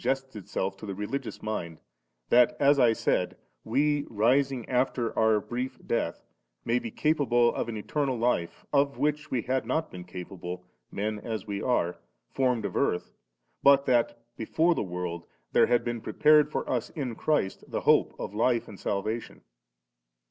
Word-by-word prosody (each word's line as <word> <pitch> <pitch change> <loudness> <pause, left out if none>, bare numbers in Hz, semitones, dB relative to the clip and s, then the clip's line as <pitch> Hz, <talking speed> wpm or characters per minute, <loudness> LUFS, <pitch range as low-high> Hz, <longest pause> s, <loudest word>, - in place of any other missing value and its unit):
ally 130 +2 +4
su^ests 135 -2 -18
itself 95 -1 -3
to 100 - -10
the 100 - -4
religious 115 +6 -4
mind, 85 -7 -4 0.5
that, 120 0 +5
as 140 0 +5
I 120 -2 +6
saidy 115 - 0 0.3
we^ 145 +5 +1
rising 125 +3 +2
after 125 -2 0
our 110 -1 +4
brief 125 +5 -4
death^ 85 -7 -2 0.4
may 120 +1 +2
be 115 - -5
capable 125 -4 +2
of - - -2
an 110 - -4
eternal 135 +4 -1
lif<^ 115 -8 +1 0.2
of 140 0 +2
which 150 0 0
we 120 -4 -1
had 130 0 0
not 155 +7 -1
been 90 -1 -8
capable', 90 0 -7 0.3
men 105 +1 -2
as 110 -2 -5
we 100 -2 -4
are, 90 -9 0 0.3
formed 125 -5 +1
of - - -4
earth, 90 - 0 0.5
but 140 0 +6
that 120 -2 +2 0.2
'before 160 +9 +2
the - - -2
world* 90 -2 -4 0.2
there - - +5
had 120 0 +2
been 120 -1 -3
prepared 150 +3 +4
for - - -2
us 125 -3 -1
in 130 -6 -4
Christ 115 -6 0
the - - -3
hope - - +3
of - - -5
life 115 +2 +1
and 100 - -11
salvation. 110 +3 -3
120 Hz, 170 wpm, -28 LUFS, 105-135 Hz, 0.5 s, I